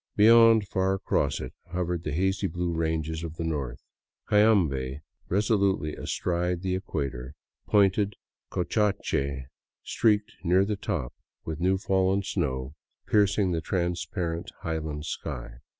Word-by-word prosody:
Beyond, 115 -1 +7
far 95 0 +1
across 70 -7 0
it, 65 - -6 0.2
hovered 90 -2 -1
the 75 - -3
hazy 95 +5 +1
blue 85 0 -2
ranges 80 -1 -1
of 80 -1 -6
the 85 - -4
north; 70 -7 -3 0.4
Cayambe 80 -11 +3 0.3
reso 105 +3 +2
lutely 95 -6 +1
astride 90 0 -2
the 95 -1 0
equator, 70 -8 -4 0.3
pointed 100 0 +3 0.3
Cotacache, 90 -9 0 0.4
streaked 105 -2 +1
near 90 +3 +4
the 105 +1 -1
top 65 -10 -3 0.3
with 80 -1 -4
new 95 +2 +2
fallen 95 0 +1
snow, 65 -8 -2 0.3
piercing 100 -2 +3
the 80 -1 -1
transparent 85 -1 -2
highland 80 -2 -3
sky. - - -6
90 Hz, 125 wpm, -27 LUFS, 75-100 Hz, 0.4 s, Beyond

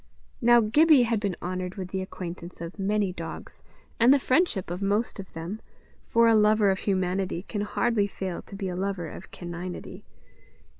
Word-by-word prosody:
Now 240 0 +6
Gibbie 290 +5 +5
had 230 -2 +1
been 200 -4 -2
honoured 185 0 -3
with 185 -2 -5
the 190 0 -2
acquaintance 180 -1 -7
of 170 +4 -7
many 200 -1 0
dogs, 165 -2 -8 0.4
and 235 +3 +7
the 280 - +7
friendship 255 - +1
of 180 +2 -4
most 205 +3 0
of 190 - -9
them, 170 +7 -6 0.5
for 230 0 +5
a 230 - +6
lover 210 -1 +4
of 190 - -1
humanity 185 -2 -1
can 205 0 -4
hardly 210 0 +1
fail 190 -3 -5
to - - -12
be 195 -1 -3
a 180 - -3
lover 190 -2 -2
of 185 - -10
caninity. 175 +1 -7
195 Hz, 180 wpm, -27 LUFS, 180-215 Hz, 0.5 s, and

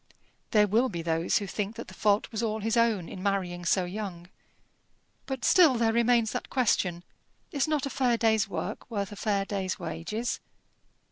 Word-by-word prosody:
There 210 -1 +5
will 230 +6 +2
be 170 -5 -5
those 165 +1 +1
who 205 - -2
think 205 +3 -3
that 235 - -7
the - - -11
fault 210 0 +1
was 220 -1 -2
all 220 -1 -1
his 225 +2 0
own 225 -7 +2
in 185 - -8
marrying 185 -3 -1
so 180 +2 +2
young. 180 -2 -6 1.0
But 265 -2 -3
still 330 -8 +6
there 230 -1 +2
remains 235 -1 +3
that - - -4
question, 185 -9 +1 0.5
Is 285 +1 0
not 300 -2 0
a - - -2
fair 245 -3 +2
day's 220 -3 +2
work - - -5
worth 200 -4 -3
a - - -7
fair 200 0 0
day's 195 -2 -2
wages? 215 +9 -3
215 Hz, 185 wpm, -28 LUFS, 190-235 Hz, 1.0 s, still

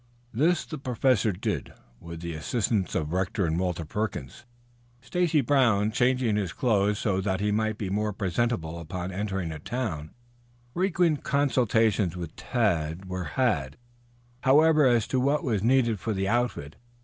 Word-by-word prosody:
This 160 +7 +2
the 155 - -7
Professor 125 -3 +1
did, 90 - -3 0.3
with 85 -1 -9
the 85 -1 -4
assistance 100 +5 -1
of 75 +1 -1
Rector 95 +1 0
and 80 +1 0
Walter 90 -3 -2
Perkins, 105 - -4 0.5
Stacy 155 +5 +1
Brown 115 -6 +3
changing 125 -2 +2
his 95 -5 -2
clothes 105 -5 +1
so 100 -4 0
that 95 -1 -1
he 105 +1 0
might 110 0 0
be 100 -4 -4
more 105 +1 0
presentable 95 -4 -2
upon 90 +2 -5
entering 95 -3 -3
a 75 - -6
town. 80 - -4 0.6
Frequent 175 -4 +1
consultations 115 - +2
with 85 -3 -6
Tad 90 -7 -1
were 90 -1 -4
had, 80 - +1 0.6
however, 150 +2 +5
as 120 -3 +3
to 130 - 0
what 140 +4 +1
was 110 -7 0
needed 120 -2 +2
for 110 +4 -2
the 95 -1 -1
outfit. 120 -10 -1
105 Hz, 150 wpm, -27 LUFS, 90-125 Hz, 0.6 s, however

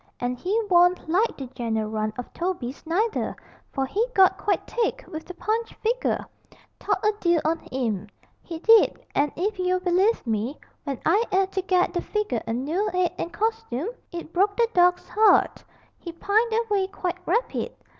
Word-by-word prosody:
And 245 0 -1
he 380 - -1
warn't 355 -2 +4
like 385 +8 +1
the 270 - -5
general 220 -3 -2
run 215 0 -2
of 250 - -7
Tobies 340 -8 -3
neither, 420 +7 0 0.4
for 270 -2 -1
he 400 - 0
got 380 -1 +6
quite 395 +1 -1
thick 470 -2 -2
with 315 0 -7
the 360 - -9
Punch 445 +4 -2
figger 475 +3 -1 0.5
thought 410 -1 -1
a 425 - +4
deal 345 -3 +3
on 325 +1 +1
'im, 225 -6 -2 0.3
he 335 - -7
did 450 +6 +4
and 285 0 +2
if 400 +3 -2
you'll 365 0 +1
believe 370 +4 +2
me, 225 +5 -2 0.3
when 275 -4 -3
I 415 - +4
'ad 380 0 +2
to 380 - -1
get 365 -1 +1
the 350 - -1
figger 420 - -2
a 225 - -1
noo 315 - -1
'ead 365 -1 +2
and 340 - -3
costoom, 435 - -2 0.2
it 340 -2 -7
broke 400 +3 +2
the 470 -1 +4
dawg's 360 0 +3
'art 435 0 +4 0.4
he 340 - -7
pined 420 +7 +1
away 430 -4 +1
quite 365 -2 -4
rapid. 455 +8 0
360 Hz, 175 wpm, -25 LUFS, 295-420 Hz, 0.5 s, got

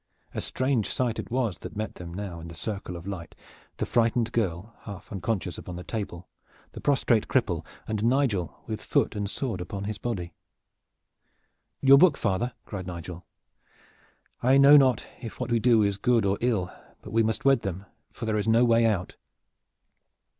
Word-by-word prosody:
A - - -3
strange 130 -5 0
sight 120 -3 -1
it - - -5
was 120 -7 -1
that - - -8
met 110 0 -3
them 85 -1 -9
now 90 -2 -5
in 80 - -8
the 85 - -9
circle 95 0 -4
of 85 0 -8
light, 95 -4 -6 0.4
the - - -1
frightened 115 0 +1
girl, 105 -1 -2
half 100 -3 -9
unconscious 95 -2 -2
against 90 -1 -7
the 90 - -7
table, 90 -6 -5 0.4
the - - -9
prostrate 125 -6 +2
cripple, - - +1 0.2
and 110 -1 -2
Nigel 115 - +1
with 110 -1 -4
foot - - +1
and 100 -1 -2
sword 115 -6 -3
upon 95 +2 -5
his 105 0 -4
body. 90 -8 -4 1.5
"Your 135 0 +8
book, 170 -5 +6
father!" 105 +5 0
cried 95 -3 -6
Nigel. 85 0 -7 1.1
"I 130 +3 +5
know 140 +1 +8
not 130 -5 +5 0.2
if 115 -3 -8
what 125 -1 -3
we 115 - +3
do 115 -2 +4
is 100 -1 0
good 115 0 +3
or 100 0 +1
ill; 110 -7 0 0.3
but - - -9
we 115 - +4
must 110 +5 -1
wed 135 -3 +5
them, 95 -1 -4 0.3
for - - -6
there 110 -1 0
is 105 - -2
no 115 +2 +5
way 115 -1 +4
out." 100 -5 -1
110 Hz, 180 wpm, -27 LUFS, 95-120 Hz, 1.5 s, Your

